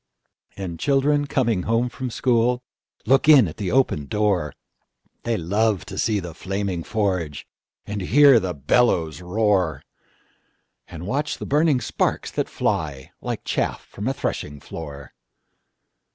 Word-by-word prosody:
And 90 -4 -5
children 145 +1 +2
coming 115 -9 +1
home 115 +2 +2
from 130 +1 -5
schoolLook 125 +2 0
in 135 -9 +8
at 75 - -8
the 100 -4 -2
open 125 - +1
door; 100 -7 0 0.7
They 115 -1 -1
love 100 +3 0
to 95 0 -8
see 110 -3 +1
the 85 -3 -7
flaming 95 0 -3
forge, 95 -9 -2 0.4
And 105 -1 -4
hear 135 +5 +6
the 90 -4 -3
bellows 80 - +1
roar, 90 -6 +1 1.0
And 85 0 -8
watch 145 +8 -2
the - - -6
burning 150 -2 +2
sparks - - -1
that - - -1
flyLike 70 -5 -3
chaff - - -2
from 105 +4 -6
a 135 - +1
threshing 75 - -4
floor. 70 -4 -9
105 Hz, 130 wpm, -23 LUFS, 85-125 Hz, 1.0 s, in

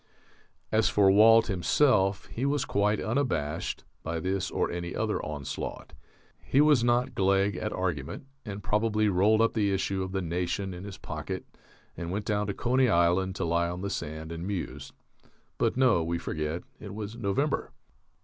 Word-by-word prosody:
As 110 0 +3
for 100 -2 +5
Walt 115 +3 +7
himself, 100 +1 +2
he 120 - -6
was 140 0 +1
quite 105 +1 +1
unabashed 90 - -1 0.2
by 80 0 -3
this 95 +2 -1
or - - -1
any 85 0 -4
other - - -1
onslaught. 75 -3 -5 0.5
He 135 - +2
was 150 -5 +5
not 120 +1 +2
gleg 100 +1 +2
at 105 - -3
argument, 90 - -3 0.2
and 105 -3 -7
probably 105 +1 +1
rolled 105 +4 +4
up 115 - +3
the 105 -3 +1
issue 95 0 -1
of 95 0 -4
the 95 -1 -2
Nation 90 +3 -2
in 90 +2 -8
his 100 -2 -8
pocket - - -5 0.5
and 85 0 -5
went 100 +3 -3
down 105 -1 0
to 100 - -1
Coney 125 +1 +2
Island 90 +1 +2
to 95 - -2
lie 85 +1 +1
on 90 +1 -5
the 100 0 -3
sand 80 +2 -5
and 85 +2 -5
muse 70 -8 -4 0.7
(but - - +1
no, 125 -10 +4
we 85 +1 -1
forget, 80 0 -3 0.2
it 105 -2 -8
was 105 +1 -5
November!). 120 +7 -1
100 Hz, 170 wpm, -28 LUFS, 85-110 Hz, 0.7 s, Walt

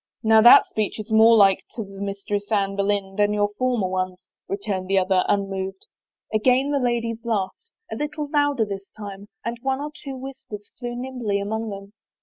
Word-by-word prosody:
" - - -56
Now 220 - +8
that 240 +2 +9
speech 215 0 -2
is 215 +1 -7
more 225 +1 +7
like 195 -2 +5
to 225 - -3
the 195 0 -11
Mistress 200 +1 -4
Anne 195 -2 +1
Boleyn 200 -1 -1
than 205 0 +3
your 205 0 +1
former 250 -6 +1
ones," 185 0 -2 0.3
returned 195 -2 -3
the 195 +1 +2
other, 185 0 +3
un 200 -1 +1
moved. 190 0 -5 0.5
Again 255 +6 +3
the 285 - +1
ladies 235 -2 -1
laughed, 225 - -3 0.2
a - - -3
little 295 0 -3
louder 290 -5 +1
this 195 -1 -7
time, 200 -1 -8 0.2
and 235 0 -3
one 265 +1 -1
or 295 +1 -5
two 280 -3 -8
whispers 255 -6 -9
flew 240 -1 -4
nimbly 245 -5 -2
among 220 +2 -3
them. 200 0 -9
210 Hz, 190 wpm, -23 LUFS, 195-245 Hz, 0.5 s, that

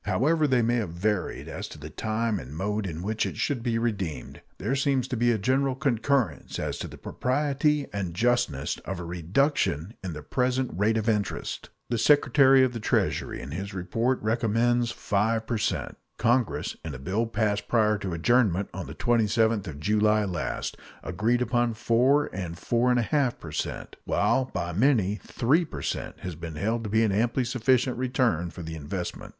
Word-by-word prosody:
However 150 - +2
they 125 -3 +3
may 120 +2 +2
have 110 -7 -1
varied 100 +2 -1
as - - -5
to - - -11
the 75 +1 -9
time 110 +3 -1
and 70 +1 -9
mode 105 +2 -1
in 85 0 -5
which 110 +2 -1
it - - -3
should 140 -5 -1
be 115 -1 0
redeemed, 100 - -3 0.2
there 115 +8 -1
seems 135 -2 +1
to - - -1
be 120 +1 +3
a 115 - +2
general 130 +5 +1
concurrence 130 - 0
as - - -3
to - - -4
the - - -11
propriety 145 +2 0
and 95 -4 -3
justness 110 - +1
of 95 -2 -5
a - - -5
reduction 90 - 0
in 90 -3 -4
the 75 -1 -8
present 130 - 0
rate 105 +5 +2
of 110 0 -2
interest. 105 -3 -2 0.2
The 120 - +1
Secretary 135 0 +5
of 130 -1 +1
the 115 - -4
Treasury 110 - 0
in 65 - -8
his 95 +5 -5
report 115 +8 0
recommends 120 +2 +2
5 110 0 0
per 115 -1 -1
cent; - - -2 0.2
Congress, 120 0 +1
in 80 -4 -5
a - - -5
bill 100 - -1
passed 105 -2 -1
prior 110 -3 +2
to 95 -3 -4
adjournment 100 +1 +2
on 90 -1 -5
the - - -8
27th 115 -2 +2
of 75 -3 -7
July 105 +4 +2
last, 90 -4 -3 0.3
agreed 115 +7 +1
upon 120 -1 +1
4 125 +6 +3
and 90 -3 -5
4 120 +6 +1
1/2 125 +1 +1
per 80 - -9
cent; - - -4
while 130 - +2
by 90 -8 -4
many 105 - +2
3 145 +9 +2
per 160 - -7
cent - - -4
has 90 -1 -4
been 80 0 -7
held 110 +8 -1
to - - -3
be 110 +2 +3
an 110 - +2
amply 115 +5 +1
sufficient 125 +1 +1
return 125 -9 +1
for 85 - -9
the 80 0 -6
investment. 85 +4 -5
110 Hz, 185 wpm, -27 LUFS, 95-125 Hz, 0.3 s, Secretary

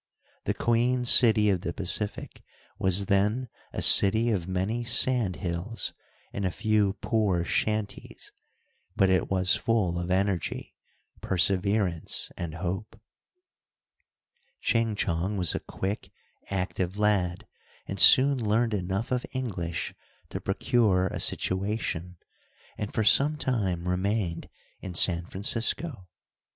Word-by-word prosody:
The - - -1
Queen 125 +2 0
city 110 -4 +6
of 90 -3 -1
the 85 - -4
Pacific 100 +2 -2 0.4
was 95 +1 +2
then 105 +6 0 0.2
a - - -1
city 110 +4 +6
of 90 -5 -2
many 95 +6 -2
sand 120 -4 +1
hills, 90 +5 -3 0.4
and 100 - -4
a 95 - +1
few 105 +2 0
poor 100 -7 0
shanties, 110 +1 -3 0.6
but 95 -1 +3
it 95 -2 +1
was 95 -1 +2
full 95 -7 -1
of 85 +1 -5
energy, 95 -1 -2 0.5
perseverance, 95 -1 +1
and 85 -2 -6
hope. 95 +5 -5 1.6
Ching 115 -2 0
Chong 95 +1 -2
was 90 -3 +2
a - - -2
quick, 100 +3 -5 0.4
active 95 0 -3
lad, 100 -4 0 0.4
and - - -5
soon 135 -1 +7
learned 110 +2 +1
enough 95 +4 -3
of 125 -1 -1
English 95 -11 -4 0.4
to - - -6
procure 95 -6 +1
a - - -5
situation, 95 -3 -2 0.6
and 105 - -5
for 110 - -1
some 145 +8 +3
time 95 - -2
remained 90 -1 -2 0.3
in 95 -2 -8
San 85 0 +3
Francisco. 115 - -2
100 Hz, 120 wpm, -27 LUFS, 90-110 Hz, 1.6 s, soon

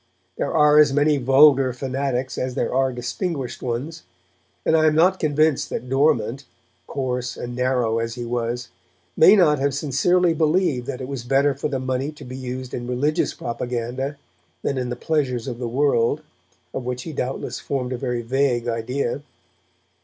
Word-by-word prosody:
There - - -2
are 150 -1 +5
as 150 -2 +6
many 145 +1 +3
vulgar 135 0 +5
fanatics 130 0 -2
as 130 -1 -3
there - - -1
are 130 0 +2
distinguished 130 +3 -4
ones, 135 +7 -4 0.6
and 160 - +3
I 155 0 +4
am 155 - +3
not 185 +4 +4
convinced 155 -1 +2
that 125 - -4
Dormant, 135 -2 +1 0.4
coarse 125 -2 -3
and 120 0 -6
narrow 125 -3 +1
as 115 0 -3
he 120 -1 -5
was, 120 0 -3 0.5
may 190 +6 +7
not 155 -7 +4
have 140 0 0
sincerely 165 +5 +2
believed 155 -5 +1
that 135 -2 -4
it 130 - -5
was 135 -3 -5
better 135 +3 +2
for 140 - -3
the 140 -2 -2
money 130 +2 -2
to 150 - -12
be 125 +1 -8
used 130 -1 -6
in 120 0 -4
religious 135 +5 0
propaganda 125 +3 -4 0.5
than 140 - -1
in 125 -1 -3
the 125 - -3
pleasures 125 -4 -1
of 120 -2 -5
the 120 - -3
world, 140 +2 +1 0.5
of 130 - -4
which 125 0 -4
he 160 - -7
doubtless 130 -1 -3
formed 130 -2 -3
a - - -3
very 125 -2 -2
vague 125 -1 0
idea. 120 +4 -2
130 Hz, 175 wpm, -22 LUFS, 125-145 Hz, 0.6 s, may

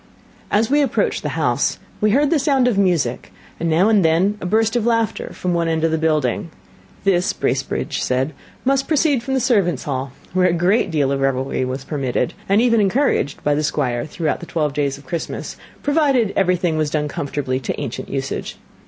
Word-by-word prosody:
As 220 +2 +2
we 295 +1 +4
approached 275 -2 0
the - - -4
house, - - +1 0.2
we 215 - +4
heard 280 +6 +3
the 325 - +3
sound 270 -3 +2
of 245 - +2
music, 170 - 0 0.3
and 170 - -1
now 165 +5 +4
and 215 -4 +4
then 170 +6 +3
a - - -3
burst 225 +3 +2
of 240 - +1
laughter 230 -2 0
from 180 -1 -2
one 170 -1 +1
end 160 -1 0
of 165 - +2
the 160 - 0
building. 155 -2 0 0.5
This, 190 0 +2
Bracebridge 130 +2 -2
said, 130 +4 0 0.3
must 275 +1 +2
proceed 295 -4 +2
from 265 +3 -2
the - - +2
servants' 200 - +1
hall, 135 -2 -3 0.2
where 185 0 +3
a 175 - +2
great 185 +4 +2
deal 145 -4 +1
of 135 0 -1
revelry 135 -1 0
was 130 +1 -4
permitted, 135 -4 -2 0.2
and 200 +2 +4
even 230 -2 +3
encouraged, 200 - +1
by 145 - +2
the 150 - 0
Squire 125 -5 -1
throughout 155 0 -2
the 170 - -9
twelve 150 -4 -1
days 140 -1 -1
of 140 - -16
Christmas, 165 +5 -5 0.3
provided 280 -8 +2
everything 180 -3 +1
was 155 -1 0
done 150 0 -1
comformably 140 -2 -3
to 120 - -3
ancient - - -5
usage. - - -4
170 Hz, 195 wpm, -20 LUFS, 145-225 Hz, 0.5 s, we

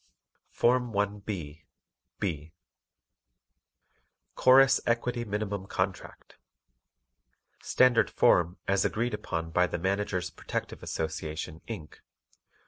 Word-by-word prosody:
FORM 125 -1 +1
1B 100 -7 -3 0.5
B 80 -4 -3 1.8
CHORUS 130 +1 +6
EQUITY 120 0 0
MINIMUM 100 -2 -3
CONTRACT 95 0 -4 1.2
Standard 120 -4 +4
Form 85 +1 +3
as 100 0 +2
agreed 120 +3 -1
upon 80 -1 -4
by 90 +2 +3
the - - -3
_Managers 95 0 -2
Protective - - -5
Association, 80 -1 -4
Inc. 95 -10 -7
100 Hz, 85 wpm, -29 LUFS, 85-115 Hz, 1.8 s, CHORUS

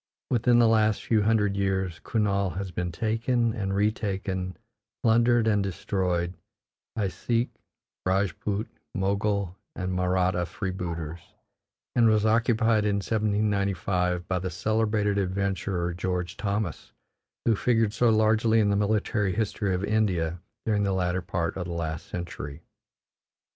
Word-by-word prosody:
Within 120 0 +4
the 120 -1 +6
last 110 -1 +3
few 110 -2 +2
hundred 105 -2 +2
years, 95 -4 -1
Kurnaul 100 -4 0
has 95 -1 -4
been 90 0 -2
taken 115 +5 0
and 95 -2 -2
retaken, 95 -3 -1 0.5
plundered 120 0 +4
and 105 -2 +3
destroyed, 90 -2 -1 0.6
by 105 -4 0
Sikh, 115 +5 -1 0.6
Rajput, 100 +2 0 0.3
Mogul, 100 -1 0 0.2
and 90 0 -3
Mahratta 90 -1 +1
freebooters, 85 -5 -4 0.8
and 115 -2 +5
was 110 0 +3
occupied 115 -1 +3
in 105 -1 +1
1795 100 -4 0
by 95 -1 0
the 95 +1 -3
celebrated 105 +2 +1
adventurer 95 -2 -1
George 90 0 -2
Thomas, 100 -4 -3 0.5
who 115 - +4
figured 115 -1 +2
so 120 0 +3
largely 110 +1 +4
in 105 -2 +3
the - - +2
military 105 -2 +1
history 105 -3 0
of 90 - -3
India 90 -6 0 0.3
during 105 -2 +2
the 100 -1 +1
latter 90 0 0
part 85 -1 -2
of 90 -2 -4
the 85 - -4
last 80 -2 -4
century. 85 -5 -6
100 Hz, 130 wpm, -27 LUFS, 90-110 Hz, 0.8 s, the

